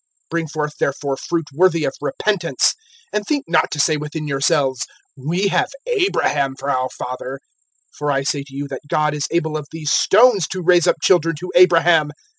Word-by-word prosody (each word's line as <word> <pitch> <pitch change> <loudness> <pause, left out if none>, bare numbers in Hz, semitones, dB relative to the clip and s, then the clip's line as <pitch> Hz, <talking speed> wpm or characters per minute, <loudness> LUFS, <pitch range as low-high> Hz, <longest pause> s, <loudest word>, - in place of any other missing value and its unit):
(8)Bring 165 -2 -1
forth 150 0 -3
therefore 140 0 -1
fruit 165 +4 -3
worthy 170 0 +3
of - - -1
repentance; 170 -1 0 0.4
(9)and 210 - 0
think 290 -2 -1
not 180 - +2
to 150 - -5
say 155 +2 +3
within 150 +1 -5
yourselves, 135 -2 +1 0.3
We 170 +9 -1
have 180 - +1 0.2
Abraham 365 - 0
for 140 +1 -3
our 130 -1 0
father; 130 +2 -6 0.6
for 145 0 -1
I 135 -1 0
say 140 +1 -1
to 135 -1 -15
you, 140 +1 -4
that 135 - -6
God 150 -1 +1
is 150 -1 -2
able 160 -2 -1
of 150 -2 -4
these 155 -2 -3
stones 215 -5 +4
to 185 -1 -5
raise 175 -1 +4
up - - +4
children 165 -3 +3
to 180 - -6
Abraham. 170 -3 +5
155 Hz, 185 wpm, -19 LUFS, 140-175 Hz, 0.6 s, Abraham